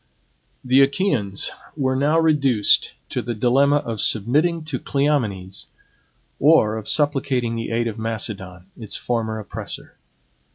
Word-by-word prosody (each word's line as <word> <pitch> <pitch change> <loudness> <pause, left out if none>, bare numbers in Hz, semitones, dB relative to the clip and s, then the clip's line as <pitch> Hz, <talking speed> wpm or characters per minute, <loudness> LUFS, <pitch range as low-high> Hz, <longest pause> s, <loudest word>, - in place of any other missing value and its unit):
The 130 +2 +4
Achaeans 135 - +1 0.3
were 130 -2 0
now 145 +4 +2
reduced 140 -9 +3 0.2
to - - -1
the 120 - -4
dilemma 135 +6 +3
of 115 -7 -2
submitting 150 - +2
to 150 -5 -4
Cleomenes, 110 -10 -1 0.7
or 140 -8 +4
of 110 -1 -5
supplicating 135 -5 +1
the 115 0 -4
aid 115 +1 0
of 110 -1 -5
Macedon, 95 -5 -4
its 110 -4 -6
former 110 -2 -2
oppressor. 105 - -8
120 Hz, 125 wpm, -21 LUFS, 110-145 Hz, 0.7 s, The